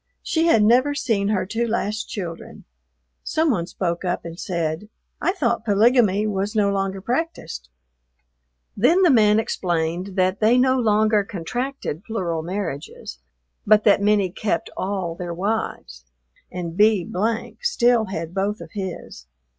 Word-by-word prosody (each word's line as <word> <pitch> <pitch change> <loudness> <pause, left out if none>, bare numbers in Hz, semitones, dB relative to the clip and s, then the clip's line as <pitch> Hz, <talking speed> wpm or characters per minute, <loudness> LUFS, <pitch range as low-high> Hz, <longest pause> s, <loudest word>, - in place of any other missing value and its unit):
She 325 0 +1
had 225 -10 +5
never 255 +6 +4
seen 225 -8 0
her 205 -3 0
two 230 +4 -2
last 220 -1 -2
children. 170 -5 -7 0.6
Some 315 -1 +1
one 170 -7 -1
spoke 175 -2 -3
up 175 -1 -2
and 170 +1 -8
said, 170 +2 -3 0.3
"I - - +2
thought 300 - -1
polygamy 215 -1 +3
was 205 0 -2
no 205 -2 +3
longer 195 -1 -2
practiced." 245 - -3 1.1
Then 330 - +4
the 350 - +6
man 215 -3 +5
explained 175 -2 -2
that 185 0 +1
they 225 +3 +4
no 260 +1 +3
longer 215 -2 +3
contracted 205 - -4
plural 180 -8 -3
marriages, 165 - -5 0.5
but 210 0 +5
that 205 -2 +4
many 205 -3 +2
kept 195 -2 -2
all 190 -3 -2
their 170 0 -6
wives 180 - -3 0.5
and 170 -2 -5
B 210 -3 +3 0.5
still 245 - +2
had 170 -4 -5
both 200 +2 -1
of - - -10
his. 185 - -7
205 Hz, 140 wpm, -22 LUFS, 180-225 Hz, 1.1 s, the